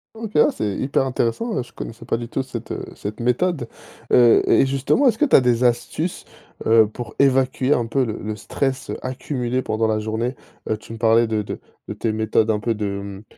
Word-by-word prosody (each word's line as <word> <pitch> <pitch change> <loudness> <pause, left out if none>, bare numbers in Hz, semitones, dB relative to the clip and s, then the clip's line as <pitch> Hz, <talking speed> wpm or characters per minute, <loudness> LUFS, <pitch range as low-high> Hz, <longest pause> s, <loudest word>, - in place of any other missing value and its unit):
OK. 220 -1 -7
Ah, - - +6
c'est 105 -2 -2
hyper 135 0 0
intéressant, 130 - -1
heu, - - -1
je 120 - -18
connaissais 115 +1 -8
pas 115 - 0
du 120 0 -6
tout 135 - -2
cette, 130 - -7
heu, - - -4
cette 105 +1 -6
méthode. 125 +3 0 0.4
Heu, 120 -2 +6
et - - +5
justement, 135 - +2
est-ce 225 -3 +3
que 300 - +3
tu 275 - +4
as - - +8
des 125 -1 +2
astuces, 125 +8 -1 0.4
heu, 110 -1 +6
pour 115 0 -8
évacuer 135 0 +3
un 120 -4 0
peu 130 +2 +1
le 110 -2 -4
le 105 0 -4
stress, 135 +4 -3
heu, - - -4
accumulé 130 -1 -2
pendant 110 +1 0
la 110 - +1
journée? 110 +4 -2 0.3
Heu, 110 - 0
tu 110 - -11
me 115 - -8
parlais 115 0 +4
de 110 -1 -1
de 105 - -6 0.3
de - - -4
tes 115 - -1
méthodes 110 0 +1
un 105 - 0
peu 115 +1 -1
de, 105 0 -3
mmh, 100 0 -5
120 Hz, 225 wpm, -22 LUFS, 110-130 Hz, 0.4 s, as